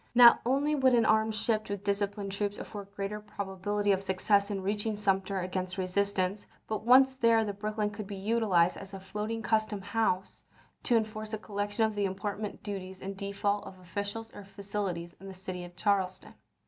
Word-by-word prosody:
Not 240 -1 +9
only 280 +4 +2
would 265 -3 +4
an 230 -2 +4
armed 220 0 +3
ship 215 0 0
with 200 -1 -4
disciplined 200 0 -1
troops 205 +1 -2
afford 205 -3 -7
greater 200 +1 -3
probability 205 0 -2
of 190 -1 +2
success 200 +1 +2
in 195 -2 -3
reaching 210 +2 0
Sumter 195 -1 0
against 185 0 -3
resistance, 195 +1 0 0.2
but 215 -1 -3
once 260 +3 +7
there 230 -3 +4
the 205 - -2
Brooklyn 210 +1 -2
could 210 -1 -7
be 200 - -5
utilized 195 -4 +2
as 195 0 -9
a - - -6
floating 210 +4 -4
custom 215 -1 +1
house, 195 -2 -1 0.4
to 240 - +2
en 220 - +2
force 215 0 -7
a - - 0
collection 205 +1 -1
of 220 - -1
the 205 -1 0
import 200 +2 -4
duties 190 -2 -6
in 195 +1 -4
default 200 +1 -1
of 190 - -10
officials 205 +5 -5
or 205 - -9
facilities 195 -3 -4
in 195 - -10
the 190 - -8
city 185 -1 -6
of 175 0 -11
Charleston. 190 -1 0
205 Hz, 185 wpm, -30 LUFS, 195-215 Hz, 0.4 s, Not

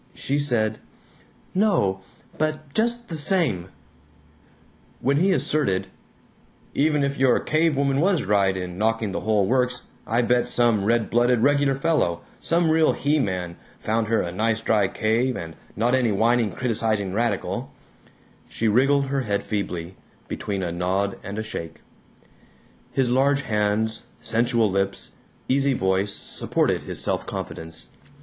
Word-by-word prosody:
she 140 +2 -1
said, 110 -6 +1 0.7
"No, 145 - +2 0.4
but 155 -2 -2
just 235 +1 0
the 165 - -5
same 145 - +1 0.7
" - - -32
When 140 +1 +3
he 185 +6 +3
asserted, 100 - 0 0.8
"Even 150 0 +2
if 140 -1 -2
your 130 -2 +4
cavewoman 140 -3 +1
was 180 +1 +2
right 95 -1 +2
in 90 0 -6
knocking 110 -1 0
the - - -2
whole 105 -3 +2
works, 125 +2 0 0.2
I 115 +2 +2
bet 120 +1 +2
some 115 -5 +2
red 115 0 +1
blooded 120 0 +3
Regular 140 +1 +3
Fellow, 135 - 0 0.2
some 165 -1 +1
real 160 0 +4
He 150 +2 +1
man, 90 -7 -2 0.2
found 110 0 -1
her 115 +1 +1
a 85 - -4
nice 110 +4 0
dry 105 -3 +2
cave, 115 +6 0
and 80 -4 -7 0.2
not 120 +3 +1
any 125 -4 +2
whining 115 +1 +2
criticizing 110 -5 -1
radical," 110 -2 -2 0.8
she 115 - -1
wriggled 135 +6 +3
her 135 0 -1
head 100 -4 -1
feebly, 95 -3 -4 0.3
between 100 -2 -3
a 85 - -2
nod 95 +3 -1
and 100 +1 -7
a 110 - -2
shake. 80 -6 -7 1.1
His 130 -3 +1
large 140 +2 +3
hands, 110 0 0
sensual 115 -1 +1
lips, 95 0 -1 0.4
easy 135 +1 +2
voice 95 0 +1
supported - - 0
his - - -3
self - - -1
confidence. 80 0 -6
115 Hz, 140 wpm, -24 LUFS, 100-140 Hz, 1.1 s, your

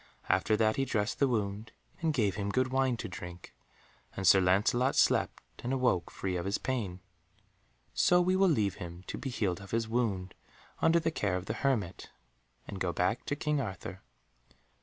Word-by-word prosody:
After 95 +4 +3
that 110 0 +2
he 135 - +1
dressed 105 -2 -1
the 140 - +4
wound, 110 -2 -2 0.3
and 165 -1 +2
gave 110 -9 +1
him 100 +1 -3
good 130 +5 +1
wine 130 -2 +1
to - - -5
drink, 90 0 -9 0.6
and 95 - -2
Sir 95 +2 +7
Lancelot 105 +8 +3
slept - - +2 0.2
and 120 - -2
awoke 125 -10 +1
free 95 -2 -3
of 85 - -4
his 100 - +1
pain. 105 -9 -3 0.9
So 180 - +4
we 180 +1 +2
will 190 0 +4
leave 105 - +1
him 85 +1 -7
to - - -5
be 135 - -4
healed 100 -6 -1
of 100 - -11
his 115 0 0
wound, 105 -6 -1 0.5
under 165 +1 +5
the 165 0 0
care 100 -10 -1
of 90 0 -3
the - - -2
hermit, 115 -10 -1 0.6
and 95 - -6
go 90 - +1
back 90 +7 0
to 145 - -1
King 150 -1 0
Arthur. 95 -4 -6
110 Hz, 185 wpm, -31 LUFS, 95-130 Hz, 0.9 s, Sir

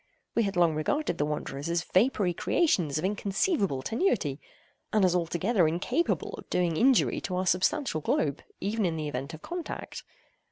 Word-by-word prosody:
We 230 - +2
had 200 -3 -1
long 170 -2 +4
regarded 290 - -1
the 145 - +1
wanderers 150 0 -4
as 170 0 0
vapory 190 -2 +2
creations 170 - +1
of 155 - -1
inconceivable 200 - 0
tenuity, 220 - 0 0.5
and 210 -3 +4
as 180 -1 +2
altogether 175 +2 +2
incapable 220 - -1
of - - -13
doing 175 -2 +1
injury 255 +7 +3
to 185 - -3
our 185 +1 0
substantial 185 - +1
globe, 145 -1 0 0.2
even 215 +3 -1
in 170 -3 0
the 155 -1 -3
event 140 +2 -4
of 155 - -15
contact. 350 -1 -6
180 Hz, 165 wpm, -28 LUFS, 155-220 Hz, 0.5 s, long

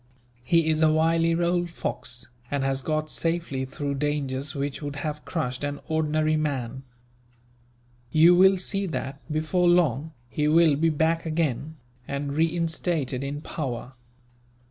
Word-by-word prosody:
He 165 +5 +3
is 155 0 +2
a 155 -1 +5
wily 165 +1 +3
old 175 0 +1
fox, 125 -7 -5 0.2
and 140 -1 -1
has 135 0 0
got 155 +2 -1
safely 165 -5 -2
through 140 +2 -4
dangers 140 -1 -1
which 140 0 -3
would 145 -1 -5
have 150 0 -4
crushed 130 -6 -3
an 145 0 -3
ordinary 155 0 +1
man. 135 -5 -2 1.3
You 165 +3 +7
will 190 +2 +6
see 195 +2 -1
that, 140 -4 -4
before 160 +4 +2
long, 160 -3 +2
he 150 +4 -1
will 160 -1 +5
be 165 +3 +2
back 165 +2 +1
again, 155 -2 -1 0.3
and 140 0 -3
reinstated 160 -4 0
in 145 +2 -4
power. 130 -5 -5
155 Hz, 140 wpm, -26 LUFS, 140-165 Hz, 1.3 s, You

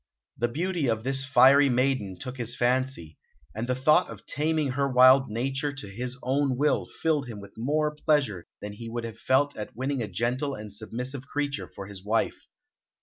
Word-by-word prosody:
The 120 - 0
beauty 165 +3 -1
of 110 -1 0
this 135 +1 +1
fiery 140 +1 +6
maiden 125 -7 0
took 130 0 -7
his 120 -1 -2
fancy, 125 - -1 0.3
and 115 +2 -4
the 125 - +2
thought 150 +7 +3
of - - -10
taming 155 -2 0
her 140 +1 0
wild 130 +1 +6
nature 135 +6 -1
to 135 -7 -7
his 125 +6 -5
own 135 0 +1
will 150 +2 +1
filled 150 -5 -1
him 110 -4 -7
with 100 - -12
more 150 +6 0
pleasure 140 - 0
than 105 0 -6
he 115 +2 -8
would 120 0 -4
have 115 -1 -7
felt 145 +2 +2
at 105 -1 -7
winning 130 +2 -2
a 110 - -2
gentle 125 +8 -1
and 105 -1 -9
submissive 125 +6 -5
creature 145 -1 -2
for 100 - -9
his 95 -1 -9
wife. 110 +2 -1
130 Hz, 190 wpm, -27 LUFS, 115-140 Hz, 0.3 s, fiery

